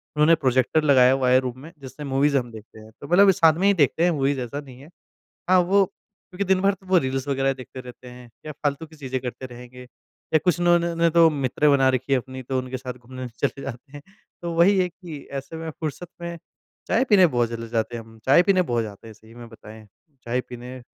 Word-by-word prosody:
उन्होंने 150 +2 +5
प्रोजेक्टर 130 +3 +1
लगाया 130 -4 +5
हुआ 130 -1 +1
है 130 +1 +5
रूम 130 -1 -5
में 160 +4 -11
जिससे 135 +3 -9
मूवीज़ 140 +1 +1
हम 120 -3 -3
देखते 110 0 -13
हैं। 110 0 -14
तो 140 - -8
मतलब 195 +4 +6
साथ 165 -4 +4
में 195 - +3
ही 200 - +5
देखते 160 -1 +2
हैं 175 - +3
मूवीज़ 140 -3 0
ऐसा 125 +4 -5
नहीं 130 -3 -12
है। 150 - -14 0.6
हाँ, 185 0 +5
वो 195 +3 +3
क्योंकि 195 0 -9
दिन 190 -1 +2
भर 195 0 +2
तो 190 0 -22
वो 185 -1 +4
रील्स 135 -2 -2
वग़ैरह 135 0 +1
देखते 130 0 -10
रहते 125 0 -12
हैं 125 -1 -13 0.2
या 155 - -5
फ़ालतू 145 +2 -3
की 160 0 -18
चीज़ें 130 -3 -4
करते 125 +1 -6
रहेंगे। 125 0 -12 0.5
या - - +7
कुछ 180 -2 +2
ना 175 0 +4
इन्होंने 170 -1 -2
ने 170 - +5
तो 165 0 +6
मित्र 140 0 0
बना 135 -2 +4
रखी 130 +1 -2
हैं 135 - +4
अपनी 130 +1 -9
तो 130 +1 -3
उनके 130 0 -4
साथ 130 0 -6
घूमने 130 +1 -9
चले 135 +4 -3
जाते 135 +1 -9
हैं। 145 0 -10 0.4
तो 170 -1 -3
वही 185 +4 +4
है 180 -1 +2
कि 170 -3 -10 0.2
ऐसे 140 +4 -8
में 160 0 -5
फ़ुर्सत 160 +3 -6
में 170 0 -5 0.5
चाय 250 - +2
पीने 195 -4 +6
बहुत 120 -6 0
चले 115 0 -6
जाते 115 0 -2
हैं 115 - -8
हम, 115 0 -17
चाय 140 +6 +6
पीने 185 -1 +3
बहुत 120 -8 -1
जाते 105 +1 -10
हैं 110 - -10
सही 110 +2 -19
में 120 -1 -11
बताएँ। 110 -1 -14 0.4
चाय 120 +2 -1
पीने 125 +1 -10
135 Hz, 240 wpm, -23 LUFS, 125-165 Hz, 0.6 s, या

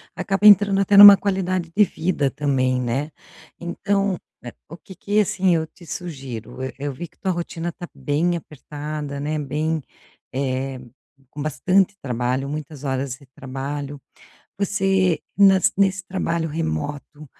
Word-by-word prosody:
acaba 195 +1 +2
entrando 205 -1 +6
até 195 +1 +2
numa 200 0 +12
qualidade 185 -3 -1
de 210 - +6
vida 160 -7 -1
também, 130 -3 0
né. 135 +6 -2 0.5
Então, 195 +2 -1 0.2
eh, 120 - -9 0.2
o 165 - -9
que 190 - -14
que, 205 +3 0
assim, 190 -3 +2
eu 160 0 -1
te 170 +2 -17
sugiro, 135 - -7
e 130 - -4
eu 145 0 -3
vi 170 +5 -7
que - - -34
tua 190 - -1
rotina 170 -1 -4
está 175 +1 -6
bem 170 +4 0
apertada, 150 -1 -7
né, 150 +2 -2
bem, 150 +2 -2 0.5
eh, 130 0 -2 0.5
com 145 - -8
bastante 180 +8 +1
trabalho, 125 +1 -2
muitas 150 0 -6
horas 130 -1 -2
de 145 - -19
trabalho. 140 +2 -6 0.6
Você 195 -3 +1 0.2
nas 195 -2 +5
nesse 195 0 +2
trabalho 170 -3 -2
remoto, 145 - -4
155 Hz, 145 wpm, -22 LUFS, 140-190 Hz, 0.6 s, numa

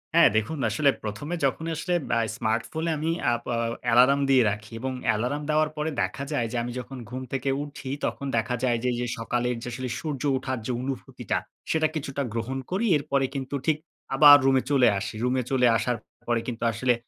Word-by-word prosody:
হ্যাঁ 170 - +8
দেখুন 125 +8 -1
আসলে 150 -2 +3
প্রথমে 145 +11 -4
যখন 160 +4 -1
আসলে 175 +3 -2 0.2
আ - - +3 0.2
স্মার্টফোনে 120 +11 -1
আমি 155 +2 -1 0.2
আ - - +3
বা 120 - -1 0.3
অ্যালার্ম 125 +4 +5
র্দিয়ে 135 -3 +5
রাখি 110 +2 -7
এবং 130 +1 -2 0.2
অ্যালার্ম 125 +7 +1
দেওয়ার 155 0 +3
পরে 150 +1 -1
দেখা 140 - -2
যায় 120 -6 0
যে - - -5
আমি 120 - -4
যখন 135 +1 -8
ঘুম 130 +1 -5
থেকে 135 0 -1
উঠি 145 -2 -8 0.2
তখন 140 - -3
দেখা 125 +2 0
যায় 120 -2 +2
যে 125 - +2 0.2
এই 120 - -4
সকালের 120 +2 -1
যে - - -6
আসলে 130 +1 -4
সূর্য 145 -5 -4 0.2
উঠার 130 -1 -3
যে 125 - -1
অনুভূতিটা 135 0 -3 0.3
সেটা 155 -1 +3
কিছুটা 140 -2 -3
গ্রহণ 115 +3 -2
করি। 205 +5 0
এরপরে 140 -2 0
কিন্তু 135 +1 -3
ঠিক 155 -2 +3 0.4
আবার 145 +1 +10
রুমে 135 -1 +4
চলে 130 -3 +5
আসি। 100 - -5
রুমে 125 0 +1
চলে 125 -2 +3
আসার 120 +2 -1 0.3
পরে 120 -1 +2
কিন্তু 120 -1 -4
আসলে 125 +3 +2
130 Hz, 195 wpm, -26 LUFS, 120-145 Hz, 0.4 s, আবার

